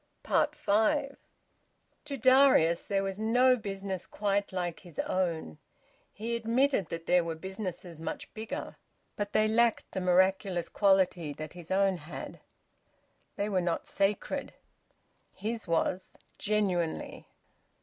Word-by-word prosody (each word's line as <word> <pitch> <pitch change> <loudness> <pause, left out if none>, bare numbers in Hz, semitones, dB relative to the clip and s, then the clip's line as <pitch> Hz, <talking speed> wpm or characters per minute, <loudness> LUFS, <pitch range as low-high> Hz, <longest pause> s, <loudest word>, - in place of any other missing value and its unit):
FIVE. 275 +7 +1 0.9
To 280 -2 -4
Darius 255 -10 +5
there 195 -1 -1
was 195 +1 -4
no 245 +4 +4
business 195 -4 -5
quite 205 -1 -1
like 175 -2 -3
his 175 -5 -14
own. 165 - -1 0.5
He 230 +3 -3
admitted 235 - +1
that 165 0 -5
there 180 -1 +4
were 165 -1 -3
businesses 185 -2 -6
much 160 0 -6
bigger, 220 0 -6 0.4
but 205 0 -3
they 215 0 +4
lacked 230 +1 +2
the 190 - -3
miraculous 185 0 +2
quality 185 -6 +2
that 155 +1 -8
his 175 -2 -11
own 195 -1 +2
had. 160 +1 -8 1.0
They 205 - -1
were 190 -3 +1
not 175 -1 -2
sacred. 200 +1 -1 0.8
His 225 0 -4
was, 175 +2 -1 0.2
genuinely. 195 -6 -1
195 Hz, 120 wpm, -30 LUFS, 175-215 Hz, 1.0 s, Darius